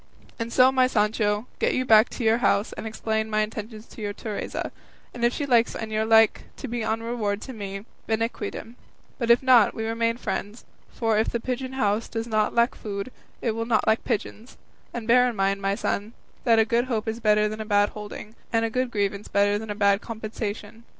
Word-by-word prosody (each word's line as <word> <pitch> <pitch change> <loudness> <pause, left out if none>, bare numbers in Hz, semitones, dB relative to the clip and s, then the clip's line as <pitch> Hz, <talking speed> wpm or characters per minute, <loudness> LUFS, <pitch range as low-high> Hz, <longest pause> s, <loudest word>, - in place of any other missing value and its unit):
And 230 0 -3
so, 255 +2 +6
my 260 -1 +4
Sancho, 210 -1 +1
get - - +1
you 255 - 0
back 220 -2 +6
to 245 - -5
your 225 +1 +3
house 210 -3 +1
and - - -6
explain 220 0 -2
my 215 0 +1
intentions 215 +1 -5
to - - -12
your 205 -1 -3
Teresa, 210 0 -5 0.4
and 240 - -6
if 240 - +4
she 290 - -3
likes 240 -4 +3
and 220 -1 -5
you 215 0 +1
like 225 0 +4
to 275 - -6
be 235 -1 -3
on 225 +1 -1
reward 215 -3 -2
with 260 - -8
me, 195 -1 -6 0.2
bene 225 +1 +1
quidem; 230 +1 -7 0.4
if 235 +1 +4
not, 250 -5 +5
we 220 - -3
remain 230 +1 0
friends; 215 -2 -4 0.2
for 225 -2 0
if 220 - +1
the 235 - -2
pigeon 255 +2 -4
house 215 -4 0
does 225 0 -3
not 215 -2 0
lack 235 +1 +3
food, 200 +3 -6 0.3
it 230 - +1
will 230 +1 -3
not 225 -3 +2
lack 220 +1 +2
pigeons; 225 0 -4 0.3
and 230 -2 -6
bear 250 +1 +5
in 240 - -6
mind, 195 0 0
my 195 0 0
son, 205 +2 -2 0.3
that 230 -2 +5
a 220 - +5
good 235 +2 +1
hope 225 -4 -2
is 220 +1 -2
better 210 -1 +3
than 215 +1 -5
a - - -2
bad 205 -1 +3
holding, 210 +1 -9 0.2
and 225 0 +2
a 225 - -3
good 255 +1 0
grievance 200 -2 -2
better 205 +1 +2
than 220 0 -8
a 205 - -3
bad 200 0 +3
compensation. 220 -1 -6
220 Hz, 215 wpm, -25 LUFS, 210-235 Hz, 0.4 s, so